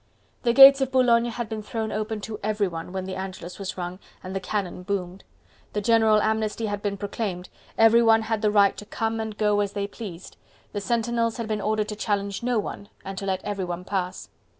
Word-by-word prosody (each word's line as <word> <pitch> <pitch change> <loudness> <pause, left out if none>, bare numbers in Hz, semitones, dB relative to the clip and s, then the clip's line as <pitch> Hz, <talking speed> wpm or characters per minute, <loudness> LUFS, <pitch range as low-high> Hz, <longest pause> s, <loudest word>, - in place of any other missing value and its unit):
The 235 - +2
gates 275 +2 +9
of 265 -1 0
Boulogne 240 -2 +4
had 235 0 -4
been 215 0 -4
thrown 220 +1 -4
open 215 0 -3
to 215 0 -6
everyone 200 -5 -2
when 190 0 -4
the 190 - -5
Angelus 185 -1 -7
was 195 -1 -5
rung 180 +1 -5 0.2
and 185 +1 -6
the - - 0
cannon 185 -2 -3
boomed. 185 0 -4 0.5
The 210 - -1
general 220 -1 +4
amnesty 220 0 0
had 205 -1 -3
been 200 -1 -2
proclaimed, 200 -2 -4 0.3
everyone 225 0 +6
had 220 -1 -1
the 215 - +3
right 205 -1 +4
to 210 - -8
come 225 +1 -2
and 220 -1 -4
go 210 -1 +2
as 205 -1 -1
they 200 -1 -2
pleased, 200 -4 -9 0.3
the 205 - -3
sentinels 230 +1 0
had 230 -2 -4
been 215 -1 -2
ordered 215 +1 0
to 210 - -4
challenge 200 -1 -2
no 245 0 0
one 205 -1 -4 0.2
and 195 0 -5
to 195 - -5
let 190 -1 -1
everyone 180 -4 -3
pass. 185 -2 -3
210 Hz, 205 wpm, -25 LUFS, 195-225 Hz, 0.5 s, gates